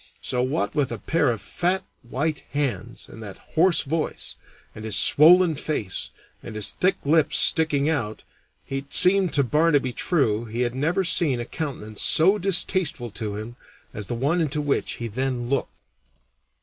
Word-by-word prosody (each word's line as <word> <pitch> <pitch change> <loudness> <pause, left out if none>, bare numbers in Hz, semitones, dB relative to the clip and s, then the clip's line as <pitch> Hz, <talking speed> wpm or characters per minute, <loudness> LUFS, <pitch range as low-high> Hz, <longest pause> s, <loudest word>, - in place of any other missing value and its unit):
So, 125 - -1
what 140 +6 -2
with 145 -5 -1
a 115 - -4
pair 145 +5 0
of 115 -4 -5
fat, 180 +2 -1 0.2
white 145 +5 -3
hands, 120 -6 -3
and 115 - -13
that 100 -3 -9 0.2
hoarse 175 +2 +3
voice, 155 +3 -1 0.4
and 110 - -10
his 110 -2 +1
swollen 170 +3 +6
face, 145 - -4 0.3
and - - -10
his 105 -2 0
thick 185 +1 0
lips 155 +1 +2
sticking 150 -3 +2
out, 125 -9 -3 0.4
it 135 +1 -3
seemed 185 0 +6
to 140 - +3
Barnaby 145 -1 +1
True 120 - 0
he 115 +2 -5
had 120 -1 -1
never 165 +9 -1
seen 165 -7 +2
a 120 - -4
countenance 120 -9 -6
so 190 +6 +3
distasteful 180 - +1
to 105 0 -5
him 110 +3 -8 0.4
as 105 -2 -6
that 120 - -4
one 145 +9 0
into 150 -1 -2
which 145 -2 -1
he 120 - -6
then 125 +1 -3
looked. 140 - -1
140 Hz, 165 wpm, -23 LUFS, 120-160 Hz, 0.4 s, swollen